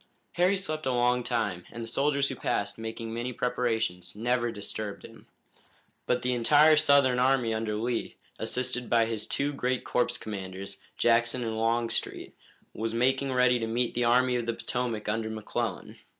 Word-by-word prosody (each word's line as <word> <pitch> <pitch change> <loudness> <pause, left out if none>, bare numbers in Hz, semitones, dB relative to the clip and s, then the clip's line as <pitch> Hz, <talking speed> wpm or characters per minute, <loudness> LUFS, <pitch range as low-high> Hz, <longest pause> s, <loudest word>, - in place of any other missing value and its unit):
Harry 180 +3 +2
slept 155 -6 -3
a - - +2
long 125 0 +2
time, 105 -8 -1
and 115 - -6
the - - -6
soldiers 140 +2 +1
who 135 - -4
passed, 105 -2 -2
making 115 0 -5
many 120 +2 -3
preparations, 115 -8 -1
never 120 +2 0
disturbed 105 -1 -5
him. - - -15 0.8
But 125 - +1
the 125 0 +1
entire 150 +6 +5
Southern 140 -4 +4
army 125 -3 +2
under 110 -1 -2
Lee, 115 +2 -2 0.2
assisted 125 +2 -2
by 115 -1 +4
his 110 -2 -3
two 145 +1 0
great 130 -2 -1
corps 125 - 0
commanders, 100 -1 -6 0.2
Jackson 120 +1 +2
and 110 -1 -2
Longstreet, 115 +1 -1 0.4
was 115 +1 -3
making 130 +3 +1
ready 125 -1 +3
to 115 - -2
meet 120 +1 0
the 120 0 +1
Army 125 +1 +3
of 120 -1 -3
the 115 - +1
Potomac 115 -2 -3
under 110 +1 -1
McClellan. 110 -1 -4
120 Hz, 165 wpm, -28 LUFS, 110-125 Hz, 0.8 s, entire